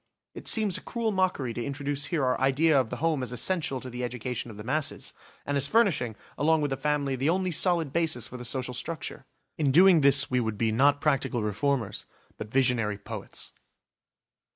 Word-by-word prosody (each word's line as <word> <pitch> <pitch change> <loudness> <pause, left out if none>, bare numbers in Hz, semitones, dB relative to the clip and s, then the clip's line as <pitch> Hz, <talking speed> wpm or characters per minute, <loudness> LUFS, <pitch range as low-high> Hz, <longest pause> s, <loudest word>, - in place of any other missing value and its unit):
It - - -8
seems 215 -5 +2
a - - -18
cruel 230 -2 -2
mockery 185 - 0
to 120 - -4
introduce 140 +1 -2
here 155 -7 -1
our 125 0 0
idea 140 +3 +3
of 120 - -6
the - - -4
home 160 -3 0
as 125 -2 -4
essential 135 +2 0
to - - -7
the 125 +1 -5
education 125 0 -4
of 105 - -10
the 105 - -8
masses, 145 +5 -2 0.3
and 145 - -2
as 140 0 +1
furnishing, 160 - +2 0.2
along 160 +1 +3
with 145 -2 -1
the - - 0
family, 140 0 -1
the 135 +4 0
only 185 +1 0
solid 165 -3 +2
basis 160 -8 +1
for - - -11
the 125 - -8
social 125 +1 -1
structure. 140 0 -6 0.3
In 145 -3 +2
doing 175 +3 +6
this 140 0 +6
we 125 - +2
would 110 -3 -2
be 110 +1 +1
not 140 +5 +3
practical 135 -6 0
reformers 110 +1 -1 0.3
but 105 - -6
visionary 120 -5 +1
poets. 105 0 -7
135 Hz, 200 wpm, -27 LUFS, 125-160 Hz, 0.3 s, doing